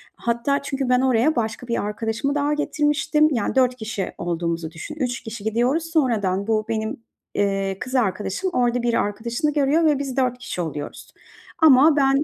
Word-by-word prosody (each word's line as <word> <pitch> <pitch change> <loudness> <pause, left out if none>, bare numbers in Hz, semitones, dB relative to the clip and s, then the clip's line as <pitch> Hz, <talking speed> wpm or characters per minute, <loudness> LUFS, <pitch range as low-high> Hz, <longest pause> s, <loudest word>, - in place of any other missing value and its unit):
Hatta 235 +4 0
çünkü 275 -2 -3
ben 250 0 +4
oraya 260 +3 +2
başka 230 +1 -2
bir 235 - -1
arkadaşımı 225 +6 -2
daha 290 0 +1
getirmiştim, 300 +1 +2
yani, 235 0 -1
4 255 -1 +3
kişi 220 -5 -4
olduğumuzu 170 -1 -2
düşün. 165 - -8
3 250 -5 -2
kişi 220 -2 -7
gidiyoruz. 245 +9 +1
Sonradan 205 - +1
bu 215 -1 +1
benim, 220 -1 -2 0.4
eee, 195 -1 0
kız 255 +1 -5
arkadaşım 210 - 0
orada 245 0 +1
bir 235 -1 +1
arkadaşını 235 +9 -1
görüyor 295 +3 +2
ve 295 -3 +3
biz 275 -2 -4
4 250 -2 +1
kişi 240 -7 -5
oluyoruz 150 -3 -6 0.5
ama 300 0 +6
ben, 275 0 +3
245 Hz, 165 wpm, -22 LUFS, 215-280 Hz, 0.5 s, ama